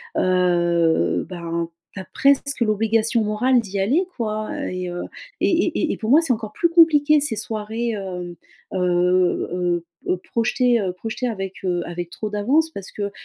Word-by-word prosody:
heu, 175 Hz, -2 st, +2 dB
bah, 170 Hz, -3 st, -7 dB, 0.4 s
tu 200 Hz, -, -7 dB
as 190 Hz, -, -7 dB
presque 280 Hz, -1 st, +2 dB
l'obligation 225 Hz, +2 st, +2 dB
morale 230 Hz, +4 st, +2 dB
d'y 200 Hz, -3 st, -4 dB
aller 265 Hz, -, +2 dB
quoi 215 Hz, -2 st, -3 dB, 0.2 s
et 185 Hz, 0 st, -4 dB
heu, 175 Hz, 0 st, -5 dB, 0.4 s
et -, -, +3 dB
et 335 Hz, -2 st, +1 dB
et -, -, -3 dB
pour 220 Hz, -, -4 dB
moi, 300 Hz, +5 st, +7 dB
c'est 325 Hz, -6 st, 0 dB
encore 215 Hz, -2 st, -2 dB
plus 340 Hz, -, +1 dB
compliqué 305 Hz, -3 st, +5 dB
ces 285 Hz, -6 st, -1 dB
soirées, 220 Hz, +2 st, -3 dB
hem, 180 Hz, -3 st, -6 dB, 0.4 s
heu, 185 Hz, -, -1 dB
heu, 180 Hz, -1 st, +1 dB, 0.2 s
heu, 180 Hz, -, +1 dB
projetées, 235 Hz, +1 st, +2 dB
heu, 185 Hz, -3 st, -2 dB
projetées 225 Hz, +6 st, -4 dB
avec, 195 Hz, -4 st, -4 dB
heu, 175 Hz, -1 st, 0 dB
avec 175 Hz, 0 st, -5 dB
trop 215 Hz, +4 st, -5 dB
d'avance, 260 Hz, +11 st, +1 dB
parce 200 Hz, -9 st, -8 dB
que, 200 Hz, -1 st, -3 dB
210 Hz, 170 wpm, -22 LUFS, 180-245 Hz, 0.4 s, moi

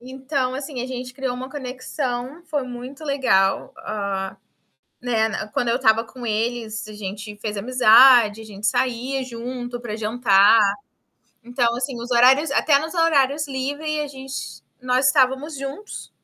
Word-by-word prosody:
Então 260 Hz, +1 st, -3 dB
assim, 275 Hz, +1 st, -6 dB
gente 250 Hz, -1 st, -6 dB
criou 265 Hz, -2 st, -3 dB
uma 260 Hz, +1 st, -7 dB
conexão, 255 Hz, +1 st, -5 dB
foi 300 Hz, -3 st, -2 dB
muito 255 Hz, +4 st, -9 dB
legal, 255 Hz, -10 st, +1 dB
ah, 200 Hz, -2 st, -4 dB, 0.7 s
né, 225 Hz, -2 st, +1 dB
n 215 Hz, 0 st, -5 dB
quando 245 Hz, -, 0 dB
eu 235 Hz, -, +2 dB
estava 225 Hz, -3 st, +3 dB
com 245 Hz, 0 st, -10 dB
eles, 220 Hz, 0 st, -2 dB
a -, -, -9 dB
gente 210 Hz, +1 st, -7 dB
fez 210 Hz, 0 st, -5 dB
amizade, 235 Hz, 0 st, +6 dB
a -, -, -9 dB
gente 210 Hz, -1 st, -6 dB
saía 255 Hz, +4 st, 0 dB
junto 245 Hz, 0 st, -6 dB
para 225 Hz, -3 st, -5 dB
jantar. 220 Hz, -1 st, +4 dB, 0.8 s
Então 240 Hz, -1 st, 0 dB
assim, 255 Hz, +2 st, -3 dB
os 240 Hz, -, -8 dB
horários 260 Hz, +5 st, +5 dB
até 285 Hz, 0 st, +3 dB
nos 320 Hz, +1 st, -5 dB
horários 300 Hz, -3 st, +2 dB
livre 290 Hz, +3 st, -3 dB
a 295 Hz, -, -3 dB
gente 270 Hz, -1 st, -8 dB, 0.2 s
nós 255 Hz, +1 st, +2 dB
estávamos 275 Hz, +2 st, +2 dB
juntos 275 Hz, +10 st, -7 dB
250 Hz, 150 wpm, -22 LUFS, 225-270 Hz, 0.8 s, amizade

